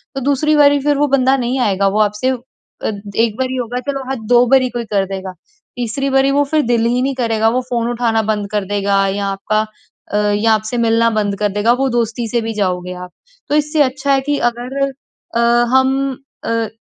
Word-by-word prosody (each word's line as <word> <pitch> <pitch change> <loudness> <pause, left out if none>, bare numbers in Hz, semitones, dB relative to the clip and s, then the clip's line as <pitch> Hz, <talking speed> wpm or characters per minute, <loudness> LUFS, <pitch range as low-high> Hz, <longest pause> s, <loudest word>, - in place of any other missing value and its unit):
तो 270 - -3
दूसरी 285 +3 +1
बारी 285 -1 +5
फिर 290 -1 +2
वो 295 0 +2
बंदा 265 0 +3
नहीं 250 +1 -1
आएगा। 195 -4 +1
वो 205 +2 0
आपसे 210 +5 0
अ, 260 - 0 0.8
1 225 -2 +1
बारी 260 0 -1
ही - - -3
होगा 245 0 -3
चलो 275 -1 -5
हाँ, 270 - -1
2 245 0 +5
बारी 260 0 +4
कोई 240 -1 -4
कर 195 -1 +2
देगा 190 -1 -6 0.4
तीसरी 260 +4 -2
बारी 270 +1 +3
वो 285 +1 +3
फिर 310 -1 +3
दिल 230 -1 +2
ही 245 +2 +1
नहीं 270 0 -1
करेगा। 225 -3 +1
वो 250 +2 0
फ़ोन 235 -1 -1
उठाना 230 -2 +1
बंद 205 -1 -2
कर 205 -2 -1
देगा 200 0 +1
या 200 +1 -2
आपका 195 +2 -1 0.5
अ, - - +2
या 210 +2 +2
आपसे 220 +3 -1
मिलना 230 0 +3
बंद 205 -2 0
कर 210 -1 +1
देगा, 210 +3 +2
वो 270 +2 0
दोस्ती 235 -1 -1
से 235 - 0
भी 225 0 -3
जाओगे 180 -3 -2
आप। 180 0 -8 0.4
तो 295 - +1
इससे 300 0 +1
अच्छा 270 +1 -1
है 270 - +2
कि 290 +1 -1
अगर 250 +4 -6 0.5
अ, - - +2 0.3
हम 265 0 +2 0.3
अ, 230 -1 0
235 Hz, 215 wpm, -17 LUFS, 210-265 Hz, 0.8 s, बारी